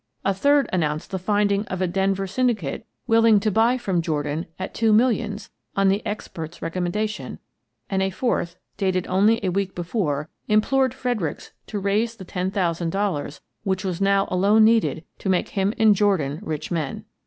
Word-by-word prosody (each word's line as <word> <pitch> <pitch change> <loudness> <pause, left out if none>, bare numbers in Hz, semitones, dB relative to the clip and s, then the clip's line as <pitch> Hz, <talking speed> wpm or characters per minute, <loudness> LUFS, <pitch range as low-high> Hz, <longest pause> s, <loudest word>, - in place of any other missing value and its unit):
A 195 - +3
third 285 +8 +3
announced 155 -2 -1
the 190 - -2
finding 205 +1 +1
of 185 - -4
a 185 - +1
Denver 195 +2 0
syndicate 220 - -1 0.2
willing 225 -2 +5
to 215 0 +1
buy 230 +5 +3
from 190 -8 0
Jordan 150 0 -2
at 190 +1 -5
two 225 -1 +2
millions 215 -2 +1 0.2
on 195 -1 +3
the 200 +3 +1
expert's 170 -5 -6
recommen 175 +1 -2
dation, 215 0 -3 0.5
and 195 -1 0
a 190 - +1
fourth, 190 -4 -1 0.2
dated 185 -2 0
only 205 +5 +3
a 185 - +1
week 190 +1 -2
before, 170 -5 -2 0.2
implored 260 +4 +2
Fredericks 245 - -3 0.2
to 210 - -4
raise 210 +4 0
the 190 - -10
ten 180 +1 -2
thousand 175 -4 -1
dol 195 +2 0
lars 145 0 -6 0.2
which 190 -1 -1
was 185 -1 -3
now 195 0 +3
alone 200 +4 +4
needed 220 -7 +3 0.2
to 195 - -3
make 185 -1 +1
him 195 0 0
and 215 -2 +5
Jordan 180 -8 +1
rich 155 +1 -5
men. 155 -5 -3
195 Hz, 175 wpm, -23 LUFS, 175-215 Hz, 0.5 s, willing